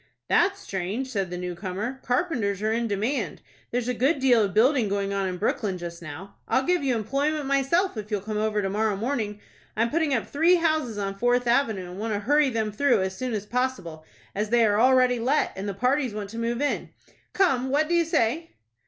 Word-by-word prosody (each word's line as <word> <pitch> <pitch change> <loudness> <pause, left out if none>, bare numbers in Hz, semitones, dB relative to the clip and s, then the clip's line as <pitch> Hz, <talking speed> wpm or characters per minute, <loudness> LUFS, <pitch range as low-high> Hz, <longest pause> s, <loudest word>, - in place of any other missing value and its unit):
"That's 395 0 +2
strange," 200 - -4
said 195 -5 -1
the 180 - -5
new 180 0 -4
comer. 200 +8 -4
"Carpenters 245 - -1
are 215 - +1
in 230 +1 0
demand. 220 +7 -2 0.3
There's 245 0 -2
a 250 - 0
good 265 +7 +2
deal 255 -4 +4
of 200 - -1
building 235 +2 +3
going 200 0 -1
on 195 -1 0
in 180 -1 -3
Brooklyn 200 -1 -1
just 170 -1 -7
now. 170 +5 -9
I'll 265 - +2
give 360 +2 +1
you 260 -3 +1
employment 280 +7 -1
myself, 275 +7 +1
if 210 0 -6
you'll 210 -3 -1
come 210 +1 -3
over 210 -1 0
to 195 - -1
morrow 215 0 +1
morning. 215 -2 -2 0.4
I'm 230 +1 +1
putting 320 -1 +1
up 235 -5 +1
three 330 +5 +3
houses 310 -9 0
on 195 -1 -3
Fourth 245 +1 +2
Avenue, 225 -8 +1
and 185 - -8
want 220 0 -2
to - - -1
hurry 290 +6 +3
them 220 -3 -1
through 240 -1 +2
as 190 0 -3
soon 250 +1 -3
as 210 -1 -4
possible, 210 -10 -3 0.3
as 210 +1 -2
they 235 0 +4
are 210 0 +2
already 255 -1 +4
let, 265 +6 +1
and 195 +2 -4
the 195 - -4
parties 250 +1 0
want 205 -1 -5
to 230 - -6
move 235 +3 -1
in. 290 - -1 0.4
Come, 265 -10 +2
what 295 +3 +2
do 345 - -1
you 340 0 +4
say?" 315 +3 0
230 Hz, 220 wpm, -25 LUFS, 200-270 Hz, 0.4 s, deal